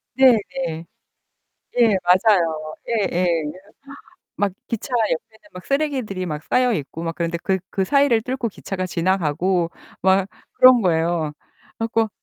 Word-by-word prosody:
네네. 240 -9 +2 0.9
예. 225 -5 +5
맞아요. 175 -5 +2
예예. 190 -5 0 1.1
막 205 -1 0 0.2
기차 230 +4 -5
옆에는 220 - -2
막 180 -1 -10
쓰레기들이 265 -10 -1
막 150 -3 -5
쌓여있고 205 - 0
막 165 0 -3
그런데 170 0 -2
그 190 -1 +1
그 190 - -1
사이를 275 -1 +3
뚫고 250 0 -3
기차가 190 -1 -5
지나가고 175 0 0 0.3
막 190 +1 +3 0.3
그런 255 -2 +7
거예요. 165 -3 0
그래 - - -32
갖고 225 -1 0
190 Hz, 260 characters per minute, -21 LUFS, 170-230 Hz, 1.1 s, 그런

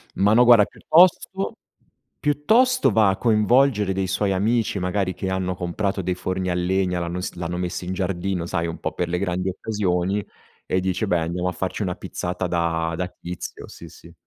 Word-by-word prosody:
Ma 100 +2 +3
no 120 - +6
guarda 120 -4 +7
piuttosto, 185 +4 +2 0.7
piuttosto 225 - +3
va 110 -3 +4
a 95 - 0
coinvolgere 110 -1 +3
dei 95 0 -1
suoi 95 +1 0
amici 110 +3 0
magari 95 +1 -1
che 95 +2 -4
hanno 95 -1 -1
comprato 95 +3 -2
dei 90 0 -2
forni 95 0 -3
a - - +1
legna, 90 0 0
l'hanno 85 +1 -3
ins 90 - -4
l'hanno 90 0 -4
messi 90 0 -3
in 90 - -3
giardino, 95 -1 -2
sai, 85 -1 -2
un 85 - -6
po' - - -3
per - - -2
le 90 +1 -1
grandi 90 -1 -1
occasioni, 95 -1 -1 0.4
e 95 - 0
dice: 95 +3 -1
"Beh, 90 -3 +2
andiamo 85 +2 -2
a 90 - -1
farci 95 +4 -3
una 90 -3 -1
pizzata 90 +1 -4
da 85 -1 -1
da 90 - -2
tizio", 90 -1 -8
sì, - - -11
sì. - - -15
95 Hz, 190 wpm, -23 LUFS, 90-105 Hz, 0.7 s, guarda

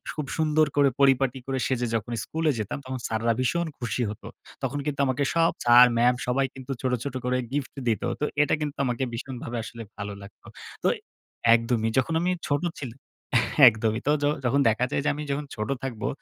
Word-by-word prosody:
খুব 150 - -3
সুন্দর 155 -1 +3
করে 140 -1 +5
পরিপাটি 135 -1 +3
করে 135 -1 -2
সেজে 125 -2 0
যখন 115 +1 -3
স্কুলে 160 -1 0
যেতাম 105 -2 -3
তখন 130 0 -4
স্যাররা 115 +1 +1
ভীষণ 170 +7 0
খুশি 120 0 -2
হত। 105 - -8 0.4
তখন 145 - -1
কিন্তু 145 -2 -3
আমাকে 130 +1 0
সব 165 0 +3
স্যার, 120 +1 +9
ম্যাম 120 +1 +4
সবাই 135 +2 +2
কিন্তু 130 0 -8
ছোট, 130 - 0
ছোট 140 -2 -5
করে 125 0 +1
গিফট 140 -1 -3 0.2
দিত। 110 -4 0 0.2
তো - - +2 0.2
এটা - - 0
কিন্তু 145 -1 -4 0.3
ভীষণভাবে 120 0 -5
আসলে 115 +1 -8 0.2
ভালো 100 0 -5
লাগতো 100 +1 -14 0.4
তো - - +3 0.7
একদমই। 115 -1 0
য - - -6
যখন 130 +5 +2
আমি 180 +1 +1 0.2
ছোট 145 +2 0 0.2
ছিলাম, 135 -1 -7 0.7
একদমই। 110 0 +2
তো - - +5
য - - +3 0.2
যখন 130 +4 +2
দেখা 115 +3 +1
যায় - - 0
যে - - +3
আমি 150 - -5
যখন 145 +1 -2
ছোট 110 +2 -4
থাকবো 120 -5 -3
130 Hz, 190 wpm, -26 LUFS, 115-145 Hz, 0.7 s, স্যার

